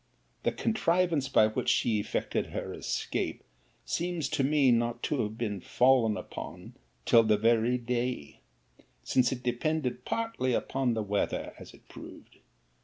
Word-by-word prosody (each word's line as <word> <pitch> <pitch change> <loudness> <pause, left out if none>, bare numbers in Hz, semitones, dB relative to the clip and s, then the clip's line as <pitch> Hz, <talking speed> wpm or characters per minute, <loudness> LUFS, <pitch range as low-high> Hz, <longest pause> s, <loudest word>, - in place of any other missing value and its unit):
The - - +1
contrivance 175 - +1
by 110 - +5
which 110 - -1
she 110 -3 +2
effected 100 - -2
her - - -5
escape - - -3 0.4
seems 175 -2 -2
to 150 -3 0
me 140 -2 +4
not 120 0 0
to 145 -4 0
have 110 0 -4
been 105 -5 -3
fallen 125 -4 +3
upon - - -8 0.3
till 115 - +6
the 110 -2 +3
very 115 +3 +3
day; 120 - -3 0.6
since 125 -1 +2
it 125 -1 -4
depended 125 0 -1
partly 225 - -1
upon 130 -1 0
the 110 - -1
weather, 100 0 -2
as - - -12
it - - -23
proved. - - -13
125 Hz, 145 wpm, -29 LUFS, 115-140 Hz, 0.6 s, till